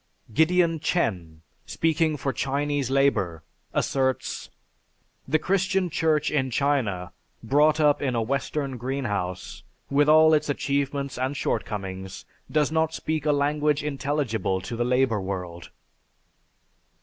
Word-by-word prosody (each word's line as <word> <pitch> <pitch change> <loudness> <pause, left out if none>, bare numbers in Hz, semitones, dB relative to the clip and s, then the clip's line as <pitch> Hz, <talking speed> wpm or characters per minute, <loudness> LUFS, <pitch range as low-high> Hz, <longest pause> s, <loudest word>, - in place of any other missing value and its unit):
Gideon 165 +3 +3
Chen, 90 - -2 0.2
speaking 160 -1 +1
for 135 -1 -2
Chinese 140 +1 -1
Labor 110 - +1 0.3
asserts: 130 -1 -1 0.8
"The 155 - +3
Christian 190 +1 0
Church 155 -2 +1
in 135 -3 0
China, 115 -10 0 0.3
brought 150 +6 +3
up 150 -2 +3
in 130 -3 0
a 115 - +1
Western 135 +2 -2
greenhouse, 110 -8 -3 0.3
with 145 +1 +3
all 155 +1 +7
its 150 -1 +2
achievements 140 -1 -1
and 130 +2 -1
shortcomings, 95 -4 -4 0.3
does 150 -1 +2
not 160 0 +1
speak 155 -1 -2
a - - +5
language 145 +1 +1
intelligible 135 -9 -1
to 115 +6 -6
the 120 - 0
labor 125 -3 +1
world." 90 -3 -5
140 Hz, 120 wpm, -25 LUFS, 115-150 Hz, 0.8 s, all